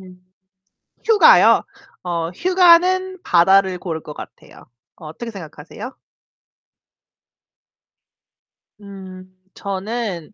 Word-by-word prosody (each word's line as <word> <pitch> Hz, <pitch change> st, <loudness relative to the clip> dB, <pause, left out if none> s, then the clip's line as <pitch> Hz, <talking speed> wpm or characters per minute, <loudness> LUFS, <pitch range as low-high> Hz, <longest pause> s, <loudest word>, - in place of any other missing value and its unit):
음. 185 Hz, 0 st, -18 dB, 0.7 s
휴가요? 445 Hz, -2 st, +5 dB, 0.4 s
어 170 Hz, -2 st, -4 dB
휴가는 370 Hz, -, +2 dB
바다를 190 Hz, +1 st, +2 dB
고를 165 Hz, -4 st, -6 dB
것 150 Hz, -, -10 dB
같아요. -, -, -14 dB, 0.3 s
어떻게 170 Hz, +9 st, -9 dB
생각하세요? 185 Hz, -, -10 dB, 2.9 s
음 185 Hz, -2 st, -13 dB
저는 200 Hz, -2 st, -6 dB
190 Hz, 165 characters per minute, -18 LUFS, 175-235 Hz, 2.9 s, 휴가요